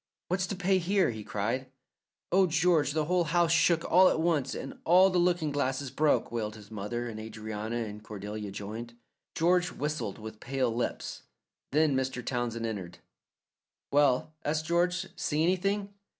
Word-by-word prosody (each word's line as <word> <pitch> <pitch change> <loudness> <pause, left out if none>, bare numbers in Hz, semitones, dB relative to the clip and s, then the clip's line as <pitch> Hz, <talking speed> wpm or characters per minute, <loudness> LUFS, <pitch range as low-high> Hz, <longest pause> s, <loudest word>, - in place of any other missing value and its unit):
"What's 185 +1 0
to 200 - -3
pay 190 0 +2
here?" 190 -2 +2
he 110 -2 -7
cried. 115 +7 -2 0.6
"Oh, 190 +1 +5
George, 160 -3 +2
the 155 -1 +1
whole 180 +1 +2
house 170 +1 +2
shook 170 0 +3
all 185 +1 +6
at - - 0
once, 160 -5 +1
and 135 - -7
all 185 +3 +6
the 180 - +2
looking 175 -3 +2
glasses 135 -1 -1
broke," 150 -2 +2
wailed 110 -2 -3
his 105 -1 -13
mother, 110 +3 -3
and 110 -2 -6
Adrianna 110 +1 -4
and 105 0 -8
Cordelia 105 0 -6
joined. 110 +4 -7 0.4
George 175 +2 +3
whistled 145 -8 -3
with 110 0 -9
pale 130 -2 -1
lips. 120 +1 -3 0.5
Then 150 -1 +3
Mr. 130 -1 -2
Townsend 120 -2 -2
entered. 95 -6 -5 0.9
"Well," 145 +1 +3
asked 155 +1 -1
George, 180 +3 +1
"see 150 +1 0
anything?" 195 +3 0
140 Hz, 160 wpm, -29 LUFS, 110-175 Hz, 0.9 s, all